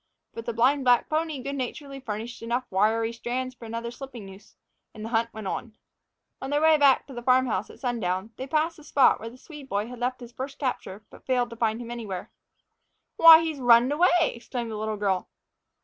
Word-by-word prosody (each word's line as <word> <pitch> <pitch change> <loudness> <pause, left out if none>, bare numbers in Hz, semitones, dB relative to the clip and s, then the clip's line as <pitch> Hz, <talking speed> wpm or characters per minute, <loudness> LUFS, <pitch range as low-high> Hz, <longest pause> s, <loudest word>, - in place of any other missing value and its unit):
But 230 - -8
the 235 - -1
blind 265 +5 +2
black 245 -1 +4
pony 310 -4 -2
good 280 +2 -4
naturedly 275 +2 -5
furnished 230 -1 -6
enough 235 +2 -1
wiry 225 +4 +1
strands 255 +2 -4
for 245 - -12
another 230 +1 -5
slipping 245 -4 -9
noose, 195 +1 -14 0.4
and 215 0 -7
the - - -5
hunt 230 0 0
went 220 -2 -8
on. 220 +3 -5 0.7
On 265 - -5
their 290 +1 +1
way 315 0 +5
to 280 -2 +3
the 240 - -6
farm 255 +1 +4
house 215 -4 -2
at - - -14
sundown, 215 -5 -2
they 260 - -6
passed 315 +3 0
the 305 - -14
spot 280 -2 +4
where 225 - -7
the 245 - -15
Swede 290 -1 -12
boy 205 +1 -1
had 250 -1 -9
left 250 +1 -2
his 240 0 -10
first 270 +3 -6
capture, 220 -7 -4
but - - -16
failed 245 -2 +1
to - - -7
find 225 -1 0
him 240 -1 -7
anywhere. 210 -7 -6 0.9
"Why, 330 0 +9
he's 315 -3 -3
runned 245 +1 +5
away!" 345 +5 +4
exclaimed 235 -4 -3
the - - -4
little 215 0 -3
girl. 195 -3 -1
240 Hz, 210 wpm, -26 LUFS, 225-270 Hz, 0.9 s, Why